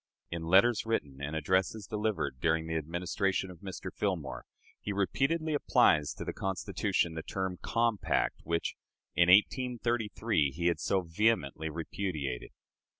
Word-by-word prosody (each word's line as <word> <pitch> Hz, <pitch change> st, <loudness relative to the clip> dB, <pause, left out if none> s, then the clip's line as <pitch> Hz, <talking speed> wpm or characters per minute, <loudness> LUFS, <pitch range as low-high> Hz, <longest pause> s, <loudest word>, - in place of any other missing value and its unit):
In 85 Hz, -1 st, -4 dB
letters 100 Hz, +6 st, +5 dB
written 75 Hz, -12 st, -2 dB
and 75 Hz, +2 st, -3 dB
addresses 95 Hz, +6 st, 0 dB
delivered 105 Hz, -11 st, -2 dB
during 80 Hz, -1 st, +2 dB
the 80 Hz, 0 st, -3 dB
Administration 90 Hz, +4 st, -1 dB
of 85 Hz, -, -13 dB
Mr. 95 Hz, -1 st, -7 dB
Fillmore, -, -, -2 dB, 0.3 s
he 105 Hz, -, -4 dB
repeatedly 140 Hz, -, 0 dB
applies 75 Hz, -, +3 dB
to -, -, -6 dB
the -, -, -3 dB
Constitution 95 Hz, -3 st, -1 dB
the 80 Hz, -, -4 dB
term 95 Hz, +1 st, -3 dB
"compact," 115 Hz, -2 st, +1 dB
which, 85 Hz, 0 st, -1 dB, 0.4 s
in 85 Hz, 0 st, +5 dB
1833, 115 Hz, -, +2 dB
he 85 Hz, +3 st, -4 dB
had 85 Hz, -1 st, +2 dB
so 95 Hz, -, +1 dB
vehemently 80 Hz, -4 st, +1 dB
repudiated. 80 Hz, -5 st, -4 dB
95 Hz, 135 wpm, -31 LUFS, 80-110 Hz, 0.4 s, letters